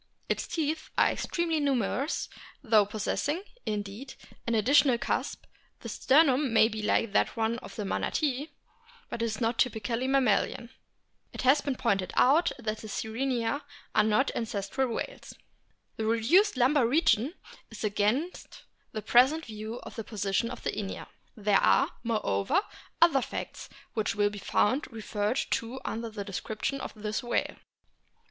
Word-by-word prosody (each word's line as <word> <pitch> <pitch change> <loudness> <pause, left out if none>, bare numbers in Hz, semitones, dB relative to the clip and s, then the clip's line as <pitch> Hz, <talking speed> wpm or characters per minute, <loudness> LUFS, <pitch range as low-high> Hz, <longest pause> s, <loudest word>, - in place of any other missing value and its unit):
Its - - -1
teeth 315 -1 -2
are - - +5
extremely 335 -2 -1
numerous, 275 0 0 0.4
though 215 -5 +4
possessing, 285 - -2 0.2
indeed, 210 +5 -4 0.3
an 230 - +1
additional 260 +3 +4
cusp; - - -2 0.4
the - - -6
sternum 275 -2 +3
may 220 -1 +6
be 220 -1 -5
like 210 +1 +1
that - - +1
of 225 +1 -2
the 210 - -4
Manatee, 280 +7 -1 0.6
but 230 - -4
is 220 -2 -1
not 230 0 0
typically 235 +1 0
mammalian 250 -2 +1 0.6
(it - - -5
has 265 +3 +5
been 275 -3 -2
pointed 195 -7 0
out 300 +7 +4
that 220 -3 -3
the 220 - -8
Sirenia 235 +4 -1 0.3
are 215 - +4
not 220 +6 +2
ancestral 225 +3 -2
whales); - - -5 0.6
the 220 - -2
reduced 260 - +3
lumbar 255 0 +4
region 300 - +2 0.3
is 225 - -9
against 215 - -1 0.3
the 215 - -4
present 265 +9 +4
view 220 +2 -6
of - - -10
the 225 - -4
position 205 +1 -1
of 250 - -8
Inia. 195 -2 -4 0.3
There 205 -1 +3
are, - - +4
moreover, 215 - +1 0.4
other 315 -6 +4
facts - - -6 0.2
which 215 -2 -1
will 205 0 +2
be 205 - -7
found 255 - +1
referred 215 +1 -2
to 235 +3 -2
under 230 +1 -3
the 210 -2 -6
description 215 +7 -3
of - - -5
this 215 0 -3
whale. 240 - -1
230 Hz, 145 wpm, -29 LUFS, 215-270 Hz, 0.6 s, may